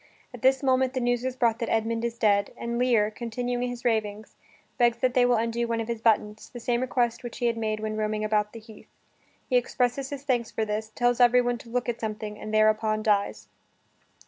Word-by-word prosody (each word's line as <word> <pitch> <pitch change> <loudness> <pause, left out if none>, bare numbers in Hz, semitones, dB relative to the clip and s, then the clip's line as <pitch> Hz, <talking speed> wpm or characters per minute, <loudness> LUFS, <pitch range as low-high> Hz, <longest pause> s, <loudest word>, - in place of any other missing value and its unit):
At 245 - -10
this 265 +2 +3
moment 260 -1 +2
the - - +1
news 245 0 0
is 260 -1 -2
brought 235 -3 +1
that 230 - -2
Edmund 225 +1 0
is 235 0 -3
dead, 200 -2 +2
and 235 0 -3
Lear, 230 -4 +3
continuing 245 +2 -3
his 245 0 -8
ravings, 215 -2 -1 0.4
begs 240 -1 +4
that 250 +1 +1
they 250 -1 +4
will 245 - +3
undo 230 +1 -1
one 230 0 -1
of 225 - -3
his 230 -2 -4
buttons 215 -1 +1
the 245 - -9
same 240 +1 0
request 245 -2 0
which 240 - -7
he 245 - -2
had 235 -1 +2
made 215 -1 -2
when 215 0 -3
roaming 215 0 -1
about 210 -1 +1
the 230 - -9
heath. 220 -1 -15 0.6
He 255 - +3
expresses 250 +2 0
his 280 -1 -6
thanks 245 -4 0
for 220 - -2
this, 215 +1 -3
tells 245 0 +1
everyone 245 0 +4
to 230 - -13
look 250 +1 -2
at 240 -1 -2
something, 215 -1 -5
and 215 - -6
thereupon 215 0 +2
dies. 200 - 0
235 Hz, 220 wpm, -26 LUFS, 215-245 Hz, 0.6 s, begs